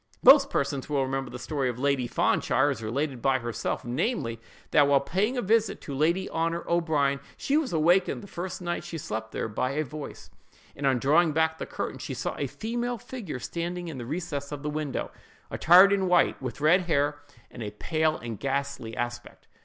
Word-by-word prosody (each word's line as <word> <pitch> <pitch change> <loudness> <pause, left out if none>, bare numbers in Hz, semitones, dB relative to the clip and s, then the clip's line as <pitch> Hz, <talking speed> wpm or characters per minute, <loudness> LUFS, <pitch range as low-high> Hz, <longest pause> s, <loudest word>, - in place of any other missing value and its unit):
Most 275 +1 +8
persons 140 - -2
will 140 -2 +1
remember 135 -1 -2
the 125 - -7
story 135 0 -2
of 120 - -4
Lady 135 -2 +1
Fanshawe, 140 +3 +2
as 120 -5 -5
related 130 +3 -2
by 135 +1 +3
herself—namely, 120 - -2 0.3
that 145 -2 +5
while 140 -1 +5
paying 200 - -1
a 245 - 0
visit 220 +1 +2
to 140 - -7
Lady 170 +7 +1
Honor 165 +1 -1
O'Brien, 155 -5 +1 0.2
she 280 - 0
was 305 -5 +1
awakened 175 +6 +2
the - - -10
first 185 0 -6
night 175 0 -2
she 165 - -6
slept 110 -6 -5
there - - -2
by 125 +5 -2
a 155 +2 0
voice, 150 +1 -9 0.4
and, 140 0 -1
on 130 -2 +3
drawing 155 +6 +3
back 160 +1 +1
the - - -4
curtain, - - -4
she - - -5
saw - - -3
a - - -1
female 240 +2 -3
figure 230 - -7
standing 175 +5 -4
in 140 -5 -6
the 120 - -6
recess 150 -2 -4
of 145 -1 -6
the 150 - -2
window, 150 -2 -3 0.4
attired 185 +4 +7
in 190 -2 +1
white, 180 -5 +3
with 130 +2 -5
red 165 +5 +5
hair 145 -2 +1 0.3
and 120 - -9
a 105 - -3
pale 155 +8 0
and 115 -3 -7
ghastly 140 -4 -3
aspect. 120 0 -5
150 Hz, 195 wpm, -27 LUFS, 135-175 Hz, 0.4 s, Most